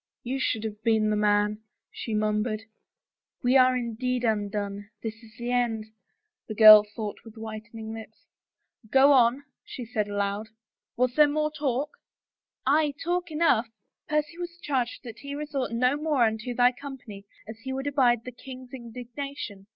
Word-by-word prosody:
"You 260 +3 -2
should 225 -4 0
have 210 -1 -5
been 220 -1 +2
the - - +2
man," 210 0 +2 0.3
she 225 - -4
murmured. 215 +1 0 0.8
"We 250 +2 +3
are 255 -1 +6
indeed 250 +1 -2
undone 205 -2 -2
— - - -38
this 220 -1 -3
is 225 -1 -17
the 240 +1 -3
end," 235 -3 0 0.6
the 215 - -5
girl 215 -1 +10
thought 210 0 -6
with 225 0 -14
whitening 220 0 -7
lips. 220 0 -11 0.3
" - - -54 0.3
Go 270 +3 +6
on," 250 +1 +4 0.2
she 245 - -7
said 215 -3 -2
aloud. 205 +1 -2 0.2
" - - -63
Was 250 0 +2
there 300 +2 +6
more 305 +1 0
talk? 290 -1 -2 0.2
" - - -67
" - - -67
Aye, 290 +1 +3
talk 350 +1 -1
enough. 305 -7 +2 0.4
Percy 300 +3 -1
was 345 0 -6
charged 260 -4 -1
that 235 -4 -9
he 280 0 -6
resort 290 -4 -3
no 250 +3 +2
more 295 -4 +1
unto 220 +2 -1
thy 245 0 +5
company 250 -7 -10 0.2
as 220 +1 -9
he 265 +3 -6
would 265 +1 -3
abide 250 -5 +3
the 250 - -6
king's 255 +1 -11
indignation 240 -3 -7
240 Hz, 175 wpm, -27 LUFS, 215-270 Hz, 0.8 s, girl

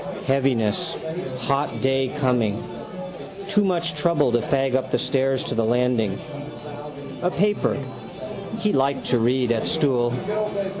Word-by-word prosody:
Heaviness: 130 -6 +1 0.4
hot 140 +3 0
day 135 -1 +2
coming. 120 -6 +1 0.9
Too 205 +1 +4
much 175 -3 +1
trouble 150 -7 +2
to 120 - +4
fag 135 +2 +1
up 130 0 +1
the - - +2
stairs 135 0 +1
to - - -2
the 115 - +2
landing. 115 -3 +2 1.0
A 180 - +2
paper. 205 +3 +1 0.8
He 210 - +1
liked 135 +1 +2
to 125 - +4
read 125 +1 +2
at 115 -1 +1
stool. 130 -6 +2
130 Hz, 130 wpm, -24 LUFS, 120-145 Hz, 1.0 s, Too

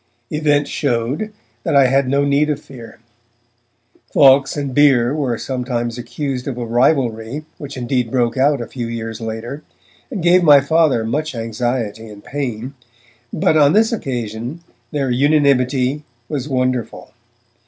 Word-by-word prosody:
Events 145 -1 +1
showed 135 - -1 0.3
that 140 - -1
I 140 -1 +6
had 135 +1 +2
no 140 +1 +2
need 140 +2 +2
of 150 - -1
fear. 120 -4 -12 1.1
Fawkes 135 0 +5
and 140 -2 -3
Bere 135 -3 +4
were 135 -6 -1
sometimes 120 -2 -3
accused 130 +1 -4
of 130 -3 -4
a 120 - -3
rivalry, 120 +2 0
which 140 -2 -8
indeed 125 -1 -1
broke 120 -1 0
out 140 0 +2
a - - -4
few 120 -3 -5
years 115 -1 -5
later, 115 +6 -5 0.5
and 210 -10 -5
gave 175 +1 +5
my 150 -4 +7
Father 140 -5 +2
much 150 +5 -2
anxiety 115 -1 -3
and 105 -1 -12
pain. 130 -2 -4 0.6
But 155 0 +2
on 145 0 +5
this 220 +2 +3
occasion 120 - -4 0.3
their 135 -2 -1
unanimity 140 0 +2 0.2
was 145 0 -4
wonderful. 130 -2 -2
130 Hz, 145 wpm, -18 LUFS, 120-145 Hz, 1.1 s, my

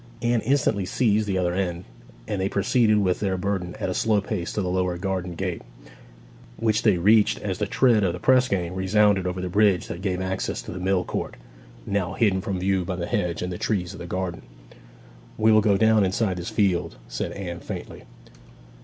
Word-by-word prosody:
Anne 120 -1 +2
instantly 115 -5 +1
seized 105 +2 +1
the 95 -2 0
other 90 -1 0
end, 90 -2 -2 0.4
and 100 - -2
they 95 - 0
proceeded 110 +2 +2
with 95 -3 +1
their 95 -2 -1
burden 90 -2 -2
at - - -2
a 90 - -1
slow 110 +2 +2
pace 100 -3 -4
to - - -3
the 95 - -1
lower 90 -1 0
garden 90 -1 -3
gate, 90 -1 -3 1.0
which 110 -1 +1
they 105 -5 +3
reached 105 +4 +4
as 95 -3 -3
the 105 - 0
tread 115 -2 +3
of 90 - +2
the 90 - -6
press 130 +4 +4
gang 90 -4 -2
resounded 95 0 +2
over 90 0 -3
the 90 - -3
bridge 100 0 +3
that 85 - -7
gave 95 -2 -1
access 95 0 -2
to - - -7
the 90 - -6
mill 95 0 +1
court, - - -4 0.5
now 95 -2 -1
hidden 95 -3 +2
from 95 0 -3
view 95 0 0
by 90 +1 -3
the 85 -1 -3
hedge 85 0 -1
and 90 0 -3
the 90 - -7
trees 95 -4 -1
of - - -10
the 85 - -7
garden. 90 -1 -3 1.0
'We 110 +1 +4
will 110 0 +6
go 100 -2 +3
down 110 0 +4
inside 95 0 0
this 90 - -5
field,' 95 -4 0
said - - -4
Anne 90 -3 -6
faintly. - - -8
95 Hz, 205 wpm, -24 LUFS, 90-105 Hz, 1.0 s, will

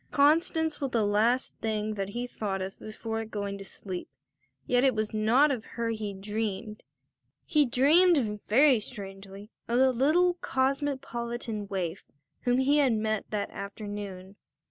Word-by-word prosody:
Constance 320 +2 +2
was 275 - 0
the 230 -4 +1
last 225 +5 +2
thing 215 -1 -1
that 195 -2 -3
he 240 +4 -3
thought 205 -5 -3
of 190 +1 -6
before 225 +1 -4
going 200 -2 -4
to - - -7
sleep; 185 -2 -7 0.6
yet 245 0 +2
it 265 -3 +4
was 215 0 -2
not 235 +8 +4
of 245 -5 -2
her 230 -1 0
he 215 -2 -3
dreamed. 210 +1 -4 0.6
He 300 -3 +3
dreamed, 275 - +4
very 265 +2 +5
strangely, 200 -1 -8 0.2
of 235 - +1
the 260 0 +5
little 320 +8 +3
cosmopolitan 260 -5 -2
waif 185 -5 -3 0.4
whom 245 0 +3
he 275 +3 +3
had 270 -5 +4
met 215 -1 -1
that 210 -1 -2
afternoon. 200 -1 -7
225 Hz, 145 wpm, -28 LUFS, 205-260 Hz, 0.6 s, very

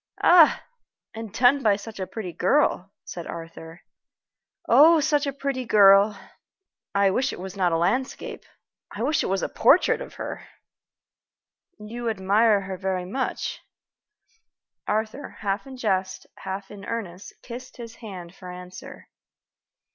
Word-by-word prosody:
"Ah! 345 -3 +6 0.5
and 225 -2 -7
done 255 +5 +4
by 210 -5 +3
such 210 +1 -9
a 185 - -3
pretty 185 -2 -6
girl," 195 - +1
said 170 -2 -7
Arthur. 165 0 -9 0.9
"Oh, 320 +3 +7
such 295 0 +1
a - - 0
pretty 275 -1 -3
girl! 200 -2 +5 0.8
I 200 -1 +4
wish 255 +7 0
it - - -8
was 190 +1 -7
not 185 -3 +1
a 165 - +2
landscape 230 +11 -2 0.5
I 215 - -5
wish 295 +4 +1
it - - -2
was 195 0 -1
a - - 0
portrait - - +3
of - - -9
her!" - - -7 1.3
"You 230 +2 -5
admire 205 +1 +3
her 190 -1 -6
very 185 -1 -2
much?" 255 +8 -3 1.3
Arthur, 220 +6 -2
half 200 +4 -2
in 265 -1 -9
jest, 190 -5 -1
half 195 +1 -6
in 200 -1 -10
earnest, 200 -5 -6
kissed 250 +1 -9
his 230 -1 -9
hand 185 -6 -9
for 185 -2 -11
answer. 180 0 -11
205 Hz, 140 wpm, -25 LUFS, 190-245 Hz, 1.3 s, Oh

